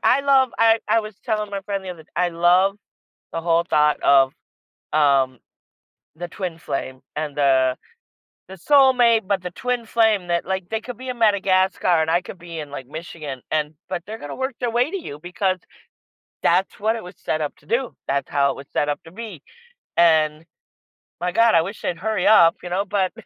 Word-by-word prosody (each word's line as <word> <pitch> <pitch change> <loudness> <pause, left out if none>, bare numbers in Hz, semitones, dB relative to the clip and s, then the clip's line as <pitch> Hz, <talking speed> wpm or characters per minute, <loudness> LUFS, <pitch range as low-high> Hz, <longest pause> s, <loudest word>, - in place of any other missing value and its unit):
I 270 - +4
love 270 -2 +4
I 225 0 +5
I 225 - +4
was 215 -1 -9
telling 215 -3 -1
my 200 -1 -3
friend 195 -1 -4
the 185 - -5
other 165 -3 -10
I 180 +1 +2
love 180 +4 +3 0.6
the 165 - -2
whole 170 0 +2
thought 150 0 +3
of, 135 -1 +5 0.6
um, 135 -4 +3 0.8
the 175 +2 -6
twin 175 -2 -5
flame, 130 -4 -5 0.2
and 150 -2 -4
the 130 -2 +3 0.7
the 190 - -10
soulmate, 245 - +4
but 195 -2 0
the 180 - -5
twin 245 +4 -3
flame 220 -5 +2
that, 170 0 0
like, 190 -1 -3
they 220 - -1
could 245 +2 -8
be 255 0 -7
in 245 -2 -5
Madagascar, 190 -5 +3
and 160 - 0
I 170 +2 +2
could 185 - -10
be 170 -1 -8
in, 150 -2 -7
like, 135 -3 -7
Michigan, 155 -3 -7
and 150 0 0 0.2
but 180 -2 -3
they're 220 +1 -7
gonna 145 - -7
work 265 -1 -3
their 245 -2 -1
way 240 +4 +2
to 395 - -2
you 150 - -8
because 185 +2 -1 0.8
that's 180 +3 +1
what 220 +2 +1
it 225 - -6
was 180 +1 -10
set 155 - -1
up 150 -2 -3
to 145 - -25
do. 240 +6 -1
That's 140 0 -1
how 140 -1 +2
it - - -11
was 135 - -10
set 145 - 0
up 145 - -2
to 165 - -13
be, 205 -7 -8 0.6
and 155 -2 +3 0.8
my 180 0 -1
God, 230 +4 +4
I 165 - +5
wish 195 +5 -7
they'd 175 - -2
hurry 215 +5 -1
up, 170 -6 +6
you - - -4
know, 190 +3 0
but, 195 -2 0
180 Hz, 205 wpm, -22 LUFS, 155-220 Hz, 0.8 s, up